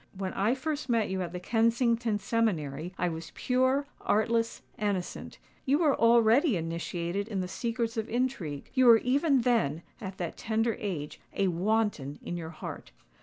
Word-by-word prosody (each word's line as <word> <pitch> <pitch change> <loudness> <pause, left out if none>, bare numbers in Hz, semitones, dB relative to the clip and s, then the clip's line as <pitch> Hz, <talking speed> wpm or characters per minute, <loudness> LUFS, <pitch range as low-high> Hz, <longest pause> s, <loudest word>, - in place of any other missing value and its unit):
When 190 -1 -3
I 215 +6 +1
first 285 0 -3
met 225 -5 +1
you 190 0 -1
at 175 -2 -3
the 180 - -5
Kensington 230 +2 +2
seminary, 180 -8 -1
I 180 - +1
was 165 -1 -5
pure, 260 +2 +2 0.2
artless, 230 +2 +1 0.2
innocent:—you 205 +7 -2
were 300 -4 +3
already 230 - +4
initiated 170 +3 -3
in 205 -4 -3
the 180 - -3
secrets 230 +4 -2
of 220 0 -2
intrigue—you 245 - 0
were 230 -1 +9
even 275 +3 +2
then, 220 - +1 0.2
at 190 -2 -6
that 175 -2 -4
tender 225 0 0
age, 175 -10 -4
a 195 -1 +2
wanton 180 -6 0
in 175 - -4
your 165 -2 -5
heart." 160 - -8
220 Hz, 155 wpm, -29 LUFS, 180-235 Hz, 0.2 s, were